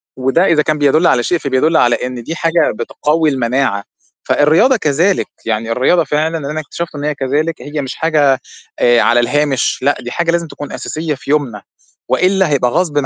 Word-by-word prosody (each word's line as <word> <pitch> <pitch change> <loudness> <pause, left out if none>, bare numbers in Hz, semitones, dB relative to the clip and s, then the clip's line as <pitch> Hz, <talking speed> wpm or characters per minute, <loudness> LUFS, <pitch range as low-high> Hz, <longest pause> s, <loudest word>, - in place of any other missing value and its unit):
وده 135 +8 +1
إذا 160 -4 +3
كان 155 0 -1
بيدل 150 +4 +3
على 120 - +2
شيء 175 - +1
فبيدل 145 +3 +1
على 120 -1 +3
إن 125 -2 -5
دي 165 - -5
حاجة 165 +1 +1
بتقوي 150 +7 0
المناعة، 125 -5 -1 0.4
فالرياضة 160 - +3
كذلك، 170 +4 +1 0.2
يعني 115 0 -2
الرياضة 145 +8 +2
فعلًا 155 +3 -1
أنا 150 +1 -4
اكتشفت 165 +1 -6
إن 145 - -6
هي 150 -1 -1
كذلك، 145 +5 -2
هي 145 0 -4
مش 135 - -6
حاجة 150 -5 +2 0.4
آآ 120 -1 +4
على 120 +1 +3
الهامش، 145 +2 0
لأ 140 +2 +1
دي 120 0 -7
حاجة 170 -1 0
لازم 170 -1 -1
تكون 145 -1 -9
أساسية 155 -1 -4
في 140 - -13
يومنا، 130 -9 -1 0.5
وإلا 190 -2 +2
هيبقى 125 -4 +1
غصبٍ 150 -5 0
145 Hz, 185 wpm, -15 LUFS, 130-160 Hz, 0.5 s, آآ